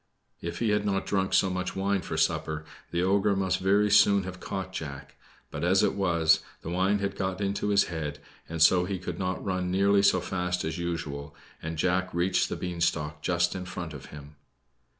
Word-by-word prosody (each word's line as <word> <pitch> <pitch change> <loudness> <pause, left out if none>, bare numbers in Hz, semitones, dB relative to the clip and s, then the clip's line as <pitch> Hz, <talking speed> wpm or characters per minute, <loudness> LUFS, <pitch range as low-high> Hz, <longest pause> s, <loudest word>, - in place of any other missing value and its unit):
If 85 - -4
he 115 - 0
had 105 0 +2
not 100 -2 0
drunk 95 -1 0
so 95 - +3
much 90 0 -3
wine 100 0 0
for - - -5
supper, 80 0 0 0.2
the 85 +1 0
ogre 100 +2 +2
must 95 -1 0
very 100 +2 +3
soon 100 -1 +5
have 90 -1 -7
caught 95 -1 -5
Jack; 70 -6 -7 0.4
but - - -5
as 95 +2 +4
it - - +2
was, 85 -5 +3 0.2
the 85 - -5
wine 95 +3 +2
had 100 0 -2
got 95 -1 -2
into 100 0 -1
his 100 -1 +4
head, 75 -4 -4 0.3
and 80 -1 +2
so 90 +1 +5
he 95 0 -2
could 90 -1 -6
not 95 0 -2
run 90 -2 -1
nearly 100 +2 +3
so 95 -2 +4
fast 90 0 -2
as 80 +3 -3
usual, 75 -4 -4 0.3
and 80 0 -5
Jack 90 +2 +1
reached 90 +2 +1
the - - -2
beanstalk 85 -4 -2
just 85 +1 +1
in 95 - -5
front 85 -3 -6
of 70 - -9
him. 75 0 -12
90 Hz, 200 wpm, -28 LUFS, 85-95 Hz, 0.4 s, soon